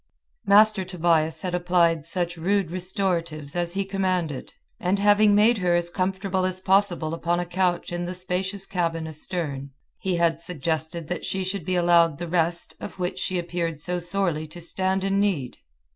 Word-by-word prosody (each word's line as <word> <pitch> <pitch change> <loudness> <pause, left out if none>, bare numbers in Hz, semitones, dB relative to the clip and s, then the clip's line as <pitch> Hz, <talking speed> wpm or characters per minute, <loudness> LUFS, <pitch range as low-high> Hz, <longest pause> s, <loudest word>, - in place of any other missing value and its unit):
Master 210 0 +6
Tobias 170 -3 +1
had 180 -1 -3
applied 175 -3 +2
such 175 0 0
rude 185 +1 0
restoratives 175 -5 -2
as 175 0 0
he 195 0 0
commanded, 185 -7 -2 0.3
and 180 +3 +1
having 205 +1 +5
made 215 +2 +4
her 175 -2 +2
as 175 0 0
comfortable 190 +1 -1
as 185 0 -1
possible 185 -4 +2
upon 170 +1 0
a 175 - -2
couch 175 0 0
in 175 0 -3
the 180 +1 -5
spacious 185 +2 -3
cabin 165 -4 -2
astern, 155 -3 -4 0.3
he 185 -2 -1
had 170 -1 +1
suggested 165 0 -2
that 180 - -3
she 190 0 -2
should 190 +2 -3
be 185 - 0
allowed 170 -3 +4
the 175 - -5
rest 170 0 0
of - - -8
which 180 -1 -3
she 185 - -1
appeared 170 -2 -3
so 180 +3 -1
sorely 175 -3 -1
to 165 +3 -10
stand 190 +2 -1
in 195 0 +1
need. 175 -12 -1
175 Hz, 175 wpm, -25 LUFS, 170-190 Hz, 0.3 s, Master